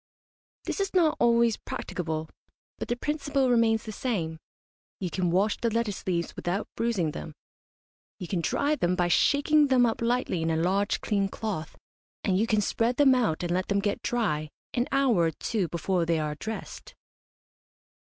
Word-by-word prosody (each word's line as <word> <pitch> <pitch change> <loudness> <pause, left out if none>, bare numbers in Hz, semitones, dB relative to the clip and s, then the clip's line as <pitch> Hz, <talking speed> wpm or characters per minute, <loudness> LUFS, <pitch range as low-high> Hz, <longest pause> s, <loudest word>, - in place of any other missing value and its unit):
This - - -3
is 390 -1 -2
not 325 -4 +4
always 235 -1 +4
practicable, 160 -2 -4 0.5
but - - -4
the 240 - 0
principle 280 -1 0
remains 225 -2 +3
the 220 - -6
same. 175 -9 -3 0.6
You 180 -3 -3
can 180 +1 0
wash 195 +5 +2
the 235 - 0
lettuce 225 -4 -2
leaves 170 -2 -1
without 185 +4 -2
bruising 215 -9 0
them. 75 - -8 0.8
You 180 - -6
can 180 -2 -1
dry 285 - +1
them 180 -9 0
by 175 -1 +1
shaking 290 - +4
them 255 -2 +4
up 230 -1 -1
lightly 235 -7 0
in 165 - 0
a 160 - +1
large 190 +5 +1
clean 200 -2 0
cloth, 195 -7 -5 0.5
and 190 - +1
you 215 +4 +2
can 215 -2 +2
spread 230 +4 0
them 280 -2 +6
out 220 -11 +1
and 175 - -2
let 185 +1 0
them 200 - +1
get 200 0 -1
dry 155 -11 -1 0.2
an 245 0 0
hour 275 -5 +3
or 165 -1 +3
two 195 +3 -2
before 175 +2 -1
they 165 -1 +2
are 150 -1 -1
dressed. 220 +8 -7
205 Hz, 175 wpm, -27 LUFS, 175-240 Hz, 0.8 s, them